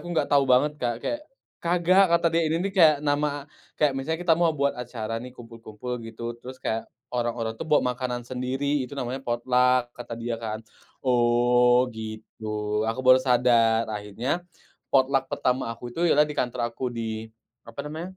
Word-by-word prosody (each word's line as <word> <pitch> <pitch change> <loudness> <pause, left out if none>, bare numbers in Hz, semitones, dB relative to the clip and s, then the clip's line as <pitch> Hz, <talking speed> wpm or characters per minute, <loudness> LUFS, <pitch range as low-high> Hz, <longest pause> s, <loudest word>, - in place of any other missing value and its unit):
aku 175 - -9
enggak 175 - +1
tau 140 - +6
banget, 130 +4 +4
Kak, 120 -1 -2
kayak, 295 - -2 0.4
"kagak," 180 +2 +4
kata 170 - 0
dia, 165 -1 +2
"Ini 165 +4 0
nih 200 - -2
kayak 160 -6 +6
nama 145 -1 0 0.3
kayak 150 -3 +3
misalnya 135 +5 -2
kita 170 - +4
mau 170 +1 +3
buat 140 0 +1
acara 115 -2 -5
nih 125 +1 -10
kumpul-kumpul 115 +1 -7
gitu 115 +1 -6
terus 130 +1 -9
kayak 115 -3 -3 0.2
orang-orang 120 -2 -1
tuh - - -5
buat 150 - +4
makanan 125 -1 -2
sendiri 130 +3 -1
itu 135 +2 -6
namanya 130 0 -3
potluck," 125 0 +2
kata 120 -1 -8
dia 115 0 -4
kan. 110 0 -5 0.4
"Oh, 120 0 +4
gitu," 110 -1 -4
aku 130 +3 -3
baru 130 0 +7
sadar, 120 -3 +3
akhirnya 110 - -3 0.5
potluck 135 0 +2
pertama 125 -2 0
aku 120 +1 -7
itu 170 +4 +1
ialah 150 -1 +5
di 150 - -5
kantor 120 -3 -2
aku, 125 +2 -3
di 110 -2 -5 0.4
apa 115 - -7
namanya, 165 +5 -7
125 Hz, 170 wpm, -26 LUFS, 115-145 Hz, 0.5 s, baru